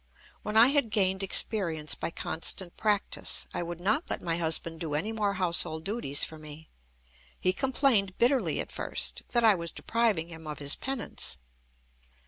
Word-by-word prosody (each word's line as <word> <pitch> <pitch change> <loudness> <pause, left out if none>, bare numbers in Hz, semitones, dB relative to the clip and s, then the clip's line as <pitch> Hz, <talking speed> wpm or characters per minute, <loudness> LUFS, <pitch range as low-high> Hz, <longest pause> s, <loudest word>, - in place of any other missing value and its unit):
When 210 +1 -2
I 235 +3 +8
had 280 -5 +1
gained 190 -3 +1
experience 175 -6 +2
by - - -4
constant 170 +2 0
practice, 210 -2 +1
I - - -2
would 175 0 -6
not 215 - 0
let - - -2
my 165 -1 -2
husband 165 0 -1
do 160 -3 -3
any 205 +9 -2
more 210 -3 -1
household 170 -3 0
duties 195 - +1
for 160 - -5
me. 155 +1 -10 0.7
He 185 - +1
complained 245 -6 +1
bitterly 255 +3 +1
at - - -3
first - - -1
that 240 -1 +1
I 220 -2 +7
was 170 -3 -3
depriving 220 -8 0
him 160 -2 -10
of 150 - -6
his 145 0 +2
penance. 265 -4 -5
185 Hz, 165 wpm, -28 LUFS, 165-220 Hz, 0.7 s, I